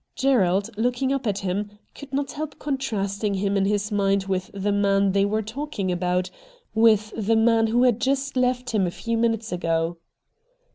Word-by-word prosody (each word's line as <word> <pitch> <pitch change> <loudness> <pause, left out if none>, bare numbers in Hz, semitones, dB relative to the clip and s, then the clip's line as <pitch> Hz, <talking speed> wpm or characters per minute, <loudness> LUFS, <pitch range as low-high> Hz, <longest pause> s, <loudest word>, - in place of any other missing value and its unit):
Gerald, 205 -6 +2
looking 250 +4 0
up 270 -3 -2
at 200 -2 0
him, 205 +2 -3 0.2
could 285 -2 -11
not 275 0 -2
help 300 -1 -6
contrasting 210 -8 -2
him 200 +1 0
in 195 -1 +2
his 205 +1 0
mind 200 -1 +1
with 190 -1 -2
the 200 +1 -2
man 200 -1 +2
they 195 +1 +2
were 215 +2 0
talking 220 -4 -4
about, 180 +1 -1 0.4
with 220 -1 +3
the 225 +1 +1
man 225 0 +4
who 240 +3 +2
had 245 -2 +3
just 270 +2 0
left 250 -1 0
him 205 -5 +1
a - - 0
few 230 +6 -3
minutes 225 -1 0
ago. 165 -1 -1
210 Hz, 180 wpm, -24 LUFS, 195-245 Hz, 0.4 s, man